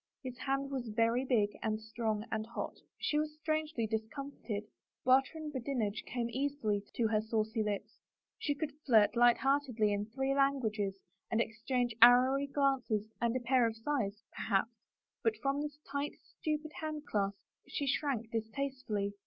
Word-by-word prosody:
His 255 -2 -5
hand 275 +1 -1
was 260 -3 -3
very 230 +3 +2
big 220 -6 +2
and 215 -1 0
strong 220 -1 -2
and 220 0 0
hot. 230 +2 -5 0.2
She 300 - +1
was 305 0 -2
strangely 310 -5 0
discomfited. 220 0 -4 0.4
Barter 265 +4 +4
and 305 -1 -5
badinage 240 -5 -1
came 240 -2 -1
easily 260 -6 0
to 230 - +2
her 215 -1 +2
saucy 220 0 0
lips, 210 -2 -3 0.4
she 290 - 0
could 290 -1 -3
flirt 220 -4 +5
light 240 0 +6
heart 275 +2 +3
edly 215 -3 +2
in 205 +1 -1
three 265 +4 0
languages 225 -8 +1 0.3
and 225 - +1
exchange 235 +2 0
arrowy 255 +4 +7
glances 265 -7 +1
and 235 0 +2
a - - +2
pair 245 0 +4
of 225 - -3
sighs, 225 -5 -2
perhaps, 210 +2 +1 0.5
but 225 -2 +2
from 275 +3 0
this 295 -1 -4
tight, 280 +1 -2
stupid 310 0 -4
handclasp 295 -11 -1 0.3
she 280 +1 -2
shrank 255 -4 0
distastefully. 225 -3 -2
240 Hz, 155 wpm, -34 LUFS, 220-275 Hz, 0.5 s, arrowy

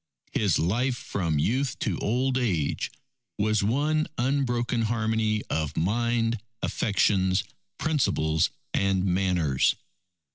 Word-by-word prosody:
His 100 -6 +2
life 120 +9 +1
from 85 -9 -2
youth 125 - 0
to 100 - -1
old 125 +4 0
age 95 - 0 0.5
was 110 0 +2
one 150 +8 +1
unbroken 120 -2 0
harmony 110 -1 0
of 75 -2 -2
mind, 115 +4 +1 0.2
affections, 95 -2 +2 0.3
principles, 80 - +1 0.2
and 95 -1 +1
manners. 90 -7 +2
110 Hz, 100 wpm, -26 LUFS, 95-120 Hz, 0.5 s, His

